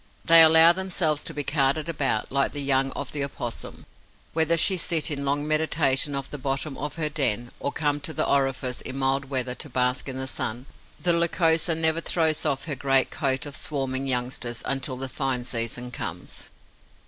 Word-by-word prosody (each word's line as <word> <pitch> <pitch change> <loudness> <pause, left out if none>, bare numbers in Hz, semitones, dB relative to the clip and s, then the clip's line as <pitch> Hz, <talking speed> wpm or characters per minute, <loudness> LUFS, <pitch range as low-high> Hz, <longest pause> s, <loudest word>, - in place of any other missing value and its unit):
They 165 0 +9
allow 160 +1 +8
themselves 175 -5 -1
to - - +3
be 145 - -3
carted 145 +2 0
about, 140 -9 -2
like 140 +1 +1
the 145 -1 -1
young 135 -1 +2
of 140 -1 -6
the 145 -2 -2
Opossum. 120 -4 -6 0.5
Whether 165 +1 +2
she 190 +4 +6
sit 165 -3 +1
in 140 -1 -2
long 145 +2 -1
meditation 150 -2 +2
at 140 0 -5
the 145 - -6
bottom 135 +2 -2
of 150 +1 -5
her 160 -2 -1
den, 120 -6 -1
or 140 - -3
come 145 -1 -1
to 155 - -5
the 155 0 -1
orifice, 135 -2 -1
in 130 - -5
mild 135 +1 0
weather, 130 -2 -2
to 145 +4 -6
bask 125 +1 0
in 130 - -5
the 130 - -3
sun, 120 -1 -4 0.3
the 175 -1 +1
Lycosa 170 -1 +1
never 160 0 +2
throws 160 -2 +1
off 140 -2 -2
her 150 -3 -3
great 135 -1 +1
coat 135 -3 -1
of 145 -1 -5
swarming 135 -2 -2
youngsters 125 -2 -2
until 135 -1 -1
the 135 +1 -4
fine 130 -2 -3
season 120 0 -3
comes. - - -6
140 Hz, 190 wpm, -24 LUFS, 130-155 Hz, 0.5 s, They